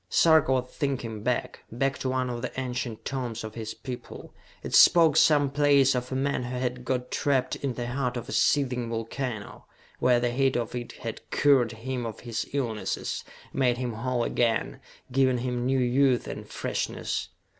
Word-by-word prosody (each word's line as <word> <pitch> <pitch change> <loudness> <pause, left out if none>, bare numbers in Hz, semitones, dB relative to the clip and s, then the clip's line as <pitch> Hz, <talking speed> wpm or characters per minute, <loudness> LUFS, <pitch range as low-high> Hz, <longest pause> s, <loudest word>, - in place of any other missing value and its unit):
Sarka 160 -5 +5
was 130 -1 +1
thinking 125 -6 -3
back, 120 +3 -1
back 135 +4 -1
to 130 - -2
one 130 0 0
of 120 -1 -4
the 125 +1 -4
ancient 125 -3 -4
tomes 125 -4 -3
of 110 -1 -6
his 110 -1 -6
people. 125 -2 -8 0.3
It - - -6
spoke, 165 -4 +7
someplace, 145 -2 +4
of 125 0 -3
a - - -1
man 135 0 0
who 125 +1 -4
had 125 0 -2
got 125 0 -2
trapped 130 -3 +1
in 135 -3 -3
the 120 - -3
heart 125 0 -2
of 120 - -6
a - - -7
seething 125 -4 +2
volcano, 115 -1 -5 0.3
where 125 -1 +4
the 120 0 0
heat 135 +1 +2
of 120 -1 -3
it 120 -1 -5
had - - -7
cured 130 -6 +3
him 120 +1 -4
of 110 - -8
his 115 -2 -4
illnesses, 120 -7 -2 0.3
made 125 -3 +2
him 125 -2 -3
whole 120 +2 -1
again, 115 -1 0 0.3
given 130 -1 +3
him 125 0 -2
new 135 0 +2
youth 130 0 +3
and - - -7
freshness. 90 - -3
125 Hz, 175 wpm, -27 LUFS, 120-135 Hz, 0.3 s, spoke